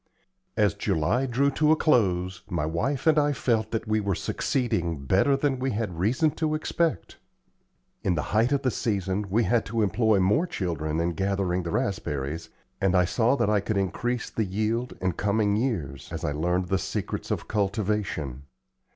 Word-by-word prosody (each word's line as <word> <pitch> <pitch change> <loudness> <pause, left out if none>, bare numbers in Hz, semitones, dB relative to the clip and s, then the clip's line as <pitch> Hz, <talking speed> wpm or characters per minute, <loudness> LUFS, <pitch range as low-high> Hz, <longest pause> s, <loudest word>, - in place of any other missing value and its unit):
As 105 -3 +3
July 100 - 0
drew 135 +3 +2
to 150 +2 +3
a - - +6
close, 95 - +1
my 85 -4 -1
wife 125 - -1
and 155 -1 +5
I 145 0 +2
felt 110 -3 0
that 115 -1 -3
we 110 0 +2
were 100 -3 0
succeeding 85 - -1
better 100 - +3
than 135 -2 0
we 130 +1 0
had 110 0 -1
had 85 -2 -9
reason 125 - +2
to 155 -1 +1
expect. 155 - -1 0.8
In 90 - +1
the 75 - -1
height 115 +5 +3
of 140 -1 +1
the 130 - +2
season 100 -2 -1
we 115 +5 +2
had 120 0 +2
to 115 +1 0
employ 110 0 +2
more 105 - +2
children 80 - -2
in 85 +1 +1
gathering 95 0 0
the 85 - -5
raspberries, 80 -3 -2 0.3
and 95 -1 +2
I 90 -1 +5
saw 115 +7 +2
that 105 - +1
I 105 - +3
could 100 +1 -2
increase 120 +5 -1
the 110 - 0
yield 110 +5 -1
in 95 0 +1
coming 100 +2 +1
years, 90 - -2
as - - -4
I - - 0
learned 90 +4 0
the 95 - +1
secrets - - -4
of - - -2
cultivation. 100 - -1
105 Hz, 185 wpm, -26 LUFS, 90-120 Hz, 0.8 s, a